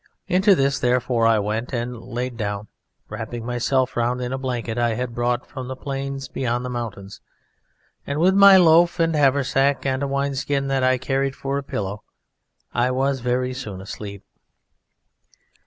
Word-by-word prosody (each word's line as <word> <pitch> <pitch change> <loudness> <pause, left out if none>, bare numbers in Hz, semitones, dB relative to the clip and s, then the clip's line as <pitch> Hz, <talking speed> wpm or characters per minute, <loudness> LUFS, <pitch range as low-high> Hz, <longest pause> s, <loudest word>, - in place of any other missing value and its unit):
Into 190 +2 +4
this, 140 -2 +1
therefore, 125 -2 +2
I 115 -1 +4
went 110 +5 -2
and 120 0 -2
laid 125 0 -4
down, 105 -2 -4 0.4
wrapping 115 +2 -6
myself 125 +2 0
round 120 +1 0
in 125 0 -3
a - - -1
blanket 120 -3 -3
I 120 -2 +1
had 125 0 -3
brought 120 +1 -1
from 130 -2 -8
the 130 - -5
plains 135 0 -5
beyond 125 -1 -2
the 125 - -4
mountains, 105 -5 -6 0.9
and, 140 - -2
with 185 +3 +4
my 200 0 +8
loaf 170 0 +5
and 165 0 +2
haversack 140 -1 +2
and 130 0 0
a 140 - 0
wine 140 +1 -1
skin 140 0 -1
that 135 -1 +1
I 130 0 +3
carried 135 +1 -1
for 140 +1 -2
a - - -7
pillow, 105 -5 -4 0.7
I 120 +1 +2
was 135 +1 0
very 125 +1 -1
soon 110 -8 -6
asleep. 100 +1 -8
130 Hz, 170 wpm, -22 LUFS, 120-140 Hz, 0.9 s, my